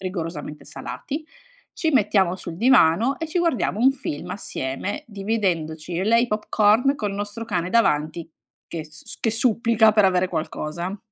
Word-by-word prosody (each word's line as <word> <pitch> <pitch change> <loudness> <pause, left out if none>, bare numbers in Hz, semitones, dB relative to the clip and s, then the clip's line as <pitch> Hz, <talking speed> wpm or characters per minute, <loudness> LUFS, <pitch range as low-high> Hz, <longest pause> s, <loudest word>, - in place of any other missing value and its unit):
rigorosamente 165 -5 -5
salati, 305 +2 -6 0.5
ci 320 - -1
mettiamo 205 - +2
sul 170 -3 -7
divano 235 +1 +4
e 325 - -3
ci 345 +3 -1
guardiamo 255 - 0
un 265 +2 +6
film 250 - -5
assieme, 195 - -4
dividendoci 185 -7 -2
io 175 +2 -1
e - - -2
lei 230 +1 +5
i - - -6
popcorn 215 +4 +3
col 210 -7 -3
nostro 205 +3 -5
cane 180 -5 -2
davanti 160 -6 +1 0.4
che 160 -2 -5
s 155 0 -15
s - - -9
che 225 - +1
supplica 230 -1 +3
per 210 -2 +4
avere 185 -1 +3
qualcosa. 170 +3 -4
205 Hz, 160 wpm, -23 LUFS, 170-230 Hz, 0.5 s, un